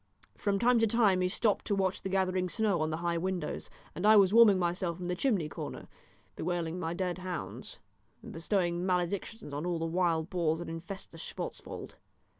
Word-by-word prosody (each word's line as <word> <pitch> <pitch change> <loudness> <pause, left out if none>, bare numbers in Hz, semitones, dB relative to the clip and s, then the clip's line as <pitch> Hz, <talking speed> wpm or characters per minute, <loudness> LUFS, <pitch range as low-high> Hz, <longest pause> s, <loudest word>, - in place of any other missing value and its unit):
From 200 -1 0
time 240 +3 +4
to 225 - +4
time 205 -4 +3
he 180 - +2
stopped 210 +2 +1
to 205 - +1
watch 190 -1 0
the 190 - -4
gathering 185 -1 +1
snow 205 -4 +1
on 155 - +1
the 155 - -2
high 170 -1 +1
windows, 185 0 -3 0.2
and 175 - -5
I 215 +1 +7
was 195 -1 +6
warming 225 -4 +8
myself 175 -1 -1
in 180 - -5
the 180 0 -1
chimney 195 - +1
corner, - - -7 0.5
bewailing 175 0 -2
my 165 0 -2
dead 180 -1 -2
hounds, 180 -2 -5 0.5
and - - -9
bestowing 175 0 0
maledictions 185 0 -2
on 145 +2 -3
all 175 -1 -1
the 165 - -2
wild 165 -1 +1
boars 165 -3 +1
that 170 - -6
infest 175 +4 -7
the 165 - -11
Schwartzwald. - - -6
180 Hz, 195 wpm, -31 LUFS, 170-195 Hz, 0.5 s, warming